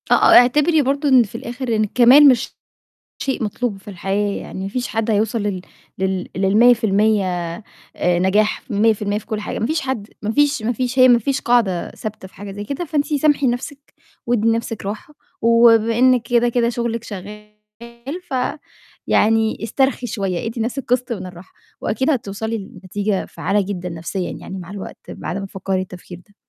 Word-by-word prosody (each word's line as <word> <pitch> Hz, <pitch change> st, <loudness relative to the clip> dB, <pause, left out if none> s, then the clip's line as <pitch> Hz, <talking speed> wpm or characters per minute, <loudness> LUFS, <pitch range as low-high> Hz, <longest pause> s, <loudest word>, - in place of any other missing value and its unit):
آه -, -, +5 dB
آه، -, -, +6 dB
اعتبري 300 Hz, +6 st, +3 dB
برضه 280 Hz, +2 st, 0 dB
إن 255 Hz, -2 st, +6 dB
في 220 Hz, -, -11 dB
الآخر 240 Hz, 0 st, -3 dB
إن 215 Hz, -, +2 dB
الكمال 250 Hz, +7 st, +6 dB
مش 255 Hz, -2 st, +2 dB, 0.6 s
شيء 265 Hz, -4 st, -2 dB
مطلوب 215 Hz, +1 st, -2 dB
في 210 Hz, -, -15 dB
الحياة، 200 Hz, +1 st, -2 dB
يعني 190 Hz, -, -7 dB
ما 195 Hz, -, -3 dB
فيش 245 Hz, +4 st, -3 dB
حد 225 Hz, 0 st, -1 dB
هيوصل 215 Hz, +1 st, 0 dB
لل 200 Hz, -3 st, -2 dB, 0.4 s
لل 190 Hz, -1 st, -2 dB
لل100% 215 Hz, 0 st, +3 dB, 0.7 s
آآ، 180 Hz, -1 st, +1 dB
نجاح، 205 Hz, +4 st, +1 dB
100% 210 Hz, -1 st, +1 dB
في 210 Hz, -, -14 dB
كُلّ 215 Hz, -1 st, -3 dB
حاجة، -, -, -5 dB
ما 220 Hz, -, -1 dB
فيش 315 Hz, +4 st, 0 dB
حد، 245 Hz, -6 st, -4 dB
ما 215 Hz, -, -1 dB
فيش، 290 Hz, -2 st, +2 dB
ما 230 Hz, +3 st, 0 dB
فيش، 250 Hz, +1 st, -3 dB
هي 255 Hz, 0 st, +8 dB
ما 240 Hz, -1 st, +6 dB
فيش 270 Hz, +4 st, -1 dB
قاعدة 220 Hz, -8 st, +1 dB
ثابتة 215 Hz, -3 st, -8 dB
في -, -, -27 dB
حاجة 200 Hz, 0 st, -8 dB
زي 205 Hz, +1 st, -6 dB
كده، 280 Hz, +9 st, -4 dB
فانتِ 295 Hz, -3 st, -1 dB
سامحي 290 Hz, -1 st, +2 dB
نفْسِك 265 Hz, +3 st, -4 dB, 0.3 s
وادّي 230 Hz, -2 st, +1 dB
لنفْسِك 225 Hz, -1 st, -2 dB
راحة، 215 Hz, +9 st, -6 dB, 0.3 s
وبما 230 Hz, -1 st, +4 dB
إنِّك 255 Hz, -1 st, +4 dB
كده، 240 Hz, 0 st, +2 dB
كده 235 Hz, 0 st, +1 dB
شغلِك 235 Hz, -1 st, -3 dB
شغال 210 Hz, +1 st, -9 dB, 0.7 s
فيعني 225 Hz, -4 st, -1 dB
استرخي 265 Hz, +2 st, 0 dB
شوية، 195 Hz, -5 st, -3 dB
ادّي 230 Hz, +1 st, -4 dB
لنفْسِك 245 Hz, +4 st, -2 dB
قِسط 250 Hz, 0 st, 0 dB
من 190 Hz, -5 st, -5 dB
الراحة، 180 Hz, 0 st, -12 dB, 0.3 s
وأكيد 260 Hz, +7 st, 0 dB
هتوصلي 220 Hz, -3 st, -2 dB
لنتيجة 200 Hz, 0 st, -3 dB
فعّالة 205 Hz, +1 st, -1 dB
جدًا 185 Hz, -2 st, -5 dB
نفسيًا 170 Hz, +2 st, -4 dB
يعني 190 Hz, -, -8 dB
مع 180 Hz, -1 st, -9 dB
الوقت 200 Hz, -1 st, -8 dB
بعد -, -, -5 dB
ما 195 Hz, 0 st, -4 dB
تفكّري 190 Hz, 0 st, -3 dB
التفكير 180 Hz, -1 st, -10 dB
ده. 205 Hz, -, -26 dB
225 Hz, 175 wpm, -20 LUFS, 200-245 Hz, 0.7 s, هي